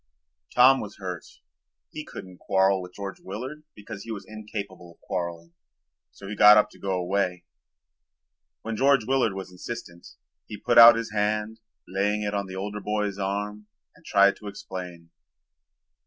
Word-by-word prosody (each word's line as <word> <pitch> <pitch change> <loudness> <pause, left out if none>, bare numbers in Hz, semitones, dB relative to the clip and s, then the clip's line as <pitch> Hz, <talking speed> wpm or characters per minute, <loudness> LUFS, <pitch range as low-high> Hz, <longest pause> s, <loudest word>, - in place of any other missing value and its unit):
Tom 130 +2 +7
was 105 -1 -8
hurt. 90 -3 -6 0.7
He 155 - -6
couldn't 90 -10 -11
quarrel 95 0 +2
with 90 0 -11
George 100 -1 -6
Willard 130 +10 -7
because 100 -1 -9
he 115 - -8
was 105 -3 -6
incapable 100 -5 -8
of - - -36
quarreling, 85 -2 -5 0.6
so 100 - -12
he 105 - -5
got 105 +1 +8
up 105 - +3
to - - -18
go 95 -1 -2
away. 90 -1 -1 1.2
When 115 0 -4
George 135 -1 +3
Willard 130 -4 +1
was 95 -1 -7
insistent 90 -2 -8 0.4
he 105 - -7
put 120 +3 +4
out 115 0 +11
his 115 -1 -4
hand, 105 +1 -1 0.3
laying 105 +3 0
it 105 0 -2
on 100 -1 -2
the 95 - -8
older 105 +2 -4
boy's 105 -1 -2
arm, 105 +2 -3 0.3
and - - -22
tried 100 0 +4
to 105 - -11
explain. 90 -4 -8
100 Hz, 160 wpm, -26 LUFS, 95-110 Hz, 1.2 s, out